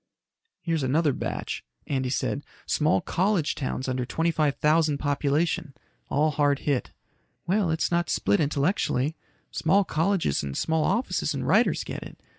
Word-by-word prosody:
"Here's 165 -3 0
another 145 +3 +2
batch," - - -4 0.2
Andy 130 -2 -1
said. 140 +2 -1 0.2
"Small 155 +3 +2
college 180 -3 +1
towns 130 -1 -3
under 130 -1 -1
twenty 165 +8 0
five 150 -3 +1
thousand 155 -1 +2
population. 145 +1 0 0.3
All 155 +2 +2
hard 145 -1 +2
hit." 140 -4 0 0.6
"Well, 195 0 +1
it's 160 +2 0
not 175 0 +1
split 100 - +2
intellectually. 150 -1 0 0.4
Small 195 +6 +3
colleges 165 - 0
and 70 -1 -4
small 160 -1 +1
offices 245 +3 0
and - - -3
writers - - +3
get - - -6
it. - - -11
150 Hz, 145 wpm, -26 LUFS, 140-165 Hz, 0.6 s, Small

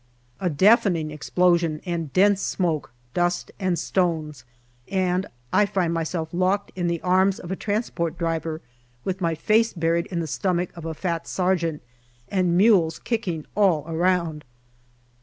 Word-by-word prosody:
A 185 - 0
deafening 175 -2 +3
explosion 170 +1 +1
and 170 -5 -3
dense 200 +3 +4
smoke, 165 -8 -1 0.2
dust, 175 0 0
and 185 -3 0
stones, 160 -7 -1 0.4
and 185 -1 0 0.3
I 205 +2 +4
find 180 -4 0
myself 165 0 -2
locked 185 +3 +1
in 175 -2 -1
the 170 -1 0
arms 185 +1 +3
of 175 - -8
a - - 0
transport 190 -6 -2
driver 165 -1 -2 0.4
with 190 0 -3
my 165 -2 +1
face 225 +6 +2
buried 165 0 0
in 175 - -3
the 165 - -1
stomach 180 +3 -1
of 170 -2 -9
a 160 -1 -4
fat 170 -1 -3
sergeant, 175 -4 0 0.5
and 180 -3 +1
mules 185 -6 +4
kicking 190 -10 -3
all 185 -7 +3
round. 165 -1 0
175 Hz, 145 wpm, -24 LUFS, 165-190 Hz, 0.5 s, dense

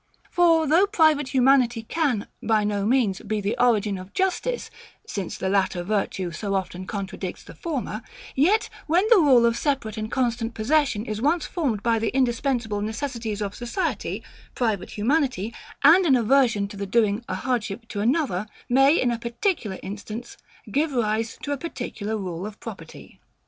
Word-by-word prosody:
For 330 -2 +4
though 335 +7 +4
private 315 -8 +3
humanity 255 -3 +3
can, 260 -5 0 0.2
by 220 -2 +2
no 205 -1 0
means, 225 -6 +2
be 215 -1 -2
the 205 +1 -1
origin 210 -5 +2
of 185 +2 -11
justice; 380 +6 -1 0.3
since 195 -4 -4
the - - -2
latter 190 -2 +1
virtue 190 -2 -1
so 195 +4 -3
often 185 -1 -3
contradicts 195 -2 -5
the - - -12
former; 265 -9 -4 0.3
yet 370 +11 +3 0.2
when 350 +6 +3
the 455 - +8
rule 260 -7 +6
of 235 -1 +3
separate 250 -6 -1
and 215 0 -4
constant 235 -3 -1
possession 240 -2 +1
is 215 -1 -4
once 310 +5 +2
formed 255 - -2
by 230 -1 +2
the 225 - 0
indispensable 240 -4 0
necessities 220 -1 -3
of 200 -1 -4
society, 240 +10 -3 0.3
private 220 -6 -1
humanity, 235 - 0 0.3
and 340 +5 +7
an 270 - +5
aversion 235 -4 +3
to 205 - -9
the 200 0 -4
doing 215 +1 +2
a 185 - -1
hardship 225 0 -2
to 205 - -4
another, 230 - +1 0.2
may, 270 +5 +5
in 245 - +2
a 235 - -2
particular 235 - -2
instance, 210 +4 -7 0.4
give 295 +5 +1
rise 225 -1 0
to 290 - -3
a 285 - 0
particular 225 -8 -4
rule 185 -1 -4
of 215 0 -11
property. - - -10
235 Hz, 165 wpm, -24 LUFS, 205-275 Hz, 0.4 s, the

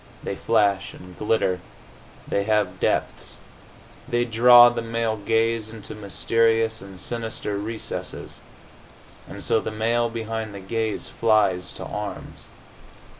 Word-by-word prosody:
They - - -3
flash 100 -4 +1
and 90 0 -13
glitter. 105 -4 +1 0.7
They 100 - 0
have 105 -1 +1
depths. - - -1 0.7
They 120 0 +1
draw 120 +1 +8
the 120 -1 -3
male 115 -1 -1
gaze 115 +1 0
into 110 -2 -8
mysterious 115 +2 +1
and 95 -2 -10
sinister 115 0 -4
recesses. 110 +2 -6 0.9
And - - -8
so 110 - +2
the - - -4
male 115 +2 0
behind 110 -2 -4
the - - -6
gaze 110 +2 -3
flies 100 -6 +1
to - - -8
arms. 105 -1 -6
110 Hz, 125 wpm, -24 LUFS, 105-115 Hz, 0.9 s, draw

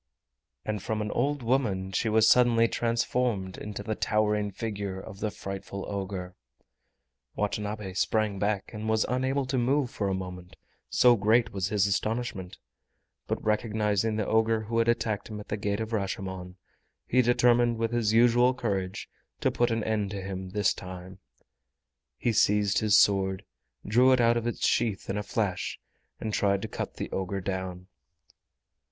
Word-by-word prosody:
And 105 -2 -2
from 110 +1 -2
an 105 - -4
old 140 +2 0
woman 110 -7 0
she 110 +4 0
was 110 0 +4
suddenly 115 -1 +5
transformed 115 -5 -1
into 105 -1 -6
the 110 - -2
towering 105 -1 +1
figure 100 -2 -4
of 100 0 -10
the 110 - -1
frightful 100 -1 -6
ogre! 95 -2 -4 1.0
Watanabe 105 -1 -3
sprang 105 +1 0
back 100 -1 -1
and 110 0 -4
was 110 0 +2
unable 130 +3 0
to 130 0 -1
move 130 +1 +1
for 100 - -2
a 95 - 0
moment, 90 -1 -7 0.3
so 125 -1 +5
great 115 +3 +2
was 95 -2 -1
his 100 -1 +2
astonishment; 100 -2 -2 0.7
but - - -3
recognizing 105 0 +1
the 110 -1 -1
ogre 110 +1 +2
who 115 +2 -1
had 115 - +2
attacked 110 -3 0
him 105 -1 -7
at 105 - -11
the 105 - -1
Gate 100 0 -1
of 110 +1 -4
Rashomon, 95 -3 -4 0.5
he 125 - +3
determined 120 -1 +3
with 115 0 -1
his 115 -3 +1
usual 120 +2 +4
courage 100 -6 -3 0.3
to - - +1
put 120 0 +1
an 115 -1 -1
end 105 -2 -1
to 100 -1 -5
him 95 -1 -5
this 105 +1 +1
time. 90 +1 -9 1.0
He 115 - 0
seized 105 -1 +3
his 105 -1 +4
sword, 95 -2 +3 0.4
drew 125 +5 +5
it 130 - +3
out 120 0 +4
of 120 0 -1
its 120 - -1
sheath 110 -5 0
in 100 - -2
a - - -1
flash, 100 -3 -2 0.4
and 110 -1 -4
tried 100 -1 +1
to - - -2
cut - - -5
the - - -5
ogre 95 +1 -2
down. 95 -1 -4
105 Hz, 165 wpm, -28 LUFS, 95-115 Hz, 1.0 s, suddenly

